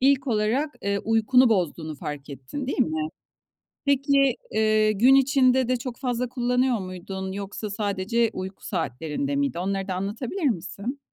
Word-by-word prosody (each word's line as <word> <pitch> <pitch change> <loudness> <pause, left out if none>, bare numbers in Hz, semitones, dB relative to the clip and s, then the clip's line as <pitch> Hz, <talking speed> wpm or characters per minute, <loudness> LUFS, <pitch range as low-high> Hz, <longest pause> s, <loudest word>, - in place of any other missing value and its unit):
ilk 270 +1 +3
olarak, 240 +7 0
eee, 200 0 0
uykunu 225 +3 +4
bozduğunu 170 -6 0
fark 145 0 -7
ettin, 140 - -6
değil 270 - -3
mi? 155 -8 0 0.8
Peki, 275 -2 +3 0.2
eee, 215 0 +3
gün 245 +6 +5
içinde 260 -2 +4
de 255 - +2
çok 240 0 -6
fazla 250 -2 -1
kullanıyor 250 -1 +1
muydun 190 +1 -6
yoksa 200 +1 -5
sadece 205 +3 0
uyku 190 +1 -7
saatlerinde 165 - -2
miydi? 280 -9 0
Onları 195 +2 -2
da 185 - -1
anlatabilir 225 - -4
misin? 220 +4 -3
220 Hz, 145 wpm, -25 LUFS, 190-260 Hz, 0.8 s, gün